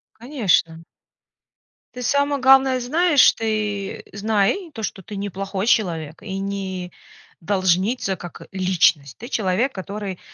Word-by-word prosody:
Конечно. 205 - 0 1.1
Ты 250 - -6
самое 285 +2 +1
главное 265 0 +5
знаешь, 300 +4 +4
ты 210 -3 -3
знай 215 - 0
то, 220 - -6
что 195 - -4
ты 205 +3 -9
не 200 +1 -3
плохой 195 +1 -4
человек 165 -9 0
и 195 -2 -5
не 190 -2 -4 0.5
должница 190 +3 +1
как 175 -2 -10
личность. 175 -7 +1
Ты 235 - -9
человек, 220 +3 0
который 195 -1 -6
200 Hz, 120 wpm, -22 LUFS, 185-240 Hz, 1.1 s, главное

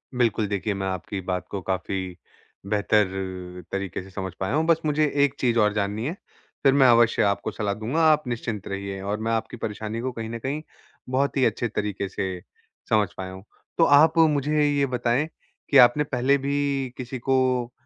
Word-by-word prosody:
बिल्कुल 115 -3 +1
देखिए 100 +1 -2
मैं 95 -1 -3
आपकी 95 +1 -4
बात 90 0 -3
को 100 - -3
काफ़ी 95 0 -3 0.5
बेहतर, 95 -3 -1
तरीके 100 -2 -3
से 95 - -13
समझ 95 -1 -5
पाया 95 +4 -2
हूँ। 155 +1 +2
बस 165 -1 +3
मुझे 150 0 +2 0.2
एक 140 - -3
चीज़ 120 -2 +1
और 105 -1 +3
जाननी 105 +2 -2
है, 155 - -2 0.5
फिर 135 -1 +5
मैं 135 -2 +6
अवश्य 115 -1 +4
आपको 100 -1 0
सलाह 105 -2 -2
दूँगा, 115 +10 -2
आप 150 0 +2
निश्चिंत 115 -4 -4
रहिए 100 0 -5
और 100 +2 -3
मैं 115 +1 -2
आपकी 115 +2 -2
परेशानी 110 0 -4
को 130 +1 -2
कहीं 115 -2 -6
न 115 0 -5
कहीं 140 +6 -3 0.5
बहुत 135 +2 0
ही 130 - +4
अच्छे 120 - 0
तरीके 105 -2 -3
से 95 -2 -3 0.5
समझ 105 -2 +3
पाया 95 -1 -5
हूँ। 95 0 -10 0.3
तो 165 - +5
आप 155 +2 +5
मुझे 150 -1 +3
ये 145 -1 +2
बताएँ 125 +2 0 0.4
कि 140 - +5
आपने 125 +3 +7
पहले 135 0 +1
भी 140 -1 -1
किसी 130 0 -6
को 130 -1 +1
115 Hz, 190 wpm, -25 LUFS, 100-135 Hz, 0.5 s, आपने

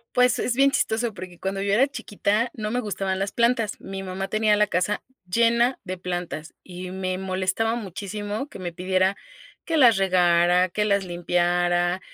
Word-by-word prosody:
Pues, 250 -2 +4
es 240 - -1
bien 275 +1 +5
chistoso, 230 -3 0
porque 180 -1 -9
cuando 195 0 -3
yo 200 0 +1
era 265 +6 +4
chiquita, 220 -3 -1
no 215 -1 -4
me 250 +2 -1
gustaban 195 -3 -2
las 195 +1 -2
plantas, 235 -3 +1
mi 195 0 -6
mamá 190 +1 -4
tenía 215 -1 +2
la 210 -1 +3
casa 190 +3 0 0.3
llena 235 +5 +2
de 185 0 -4
plantas 175 -3 -5
y 180 0 -8
me 185 -1 -3
molestaba 190 +4 -1
muchísimo 205 - -5
que - - -11
me 180 -2 -4
pidiera 185 +2 +1 0.5
que 330 - -1
las 240 -9 +6
regara, 180 -1 +3
que 210 +3 -1
las 200 -1 +2
limpiara, 175 0 +1
195 Hz, 175 wpm, -24 LUFS, 180-220 Hz, 0.5 s, las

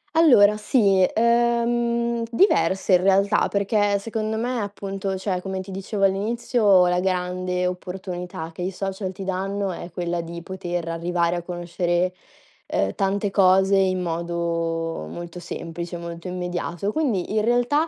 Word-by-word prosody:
Allora 210 -11 +6
sì, 205 -3 +3
uhm, 235 0 +2
diverse 195 - +2
in 180 - +6
realtà, 195 +2 +3
perché 205 0 +1
secondo 220 +1 -3
me, 245 +2 -1
appunto 195 -2 -4
cioè 185 -1 -2
come 190 0 -4
ti 190 +1 -7
dicevo 195 +2 -3
all'inizio, 205 0 +3
la 180 0 +2
grande 180 0 -1
opportunità 180 -2 -5
che 170 - -8
i 180 - -1
social 195 0 -4
ti 190 +1 -8
danno 195 +1 -2
è 175 - -7
quella 175 0 -2
di 170 0 -8
poter 175 -2 -4
arrivare 170 +1 0
a - - -3
conoscere, 175 +1 -1 0.5
uhm, 95 0 0
tante 200 +1 0
cose 190 0 +4
in 185 -1 +2
modo 165 - -2
molto 175 - -7
semplice, 170 0 -6
molto 170 +1 -7
immediato. 180 +1 -3
Quindi 220 - -1
in 215 - +2
realtà 245 +7 +2
190 Hz, 140 wpm, -23 LUFS, 175-205 Hz, 0.5 s, Allora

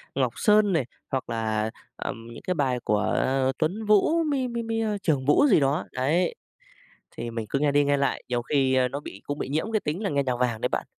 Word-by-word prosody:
Ngọc 130 -4 +1
Sơn 210 -2 +4
này, 150 -6 +1 0.2
hoặc 130 -2 -3
là, 110 -1 -1 0.3
ờm, 115 0 -6
những - - -11
cái 185 - 0
bài 130 -6 0
của 105 0 +1 0.4
Tuấn 185 +8 -1
Vũ, 215 +11 +4
mi 275 -5 0
mi 235 -1 -3
mi, 225 0 -2
ơ, 215 -2 0
Trường 150 -8 0
Vũ 150 - +5
gì - - +5
đó, 140 +4 +1
đấy. 155 +8 +1 0.8
Thì 120 0 -4
mình 115 -1 -4
cứ 140 - 0
nghe 145 0 +2
đi 145 0 +4
nghe 145 0 +2
lại 140 0 0
nhiều 120 -1 -1
khi, 135 0 +1
a, 130 -1 +3
nó 140 +3 -5
bị 100 -8 -10
cũng 145 0 -3
bị - - -3
nhiễm 155 +10 -2
cái 215 - +2
tính 165 +6 -3
là 200 - -1
nghe 140 -1 +1
nhạc 125 -2 -1
vàng 120 -3 0
đấy - - +1
bạn. - - -2
145 Hz, 240 wpm, -26 LUFS, 125-200 Hz, 0.8 s, Vũ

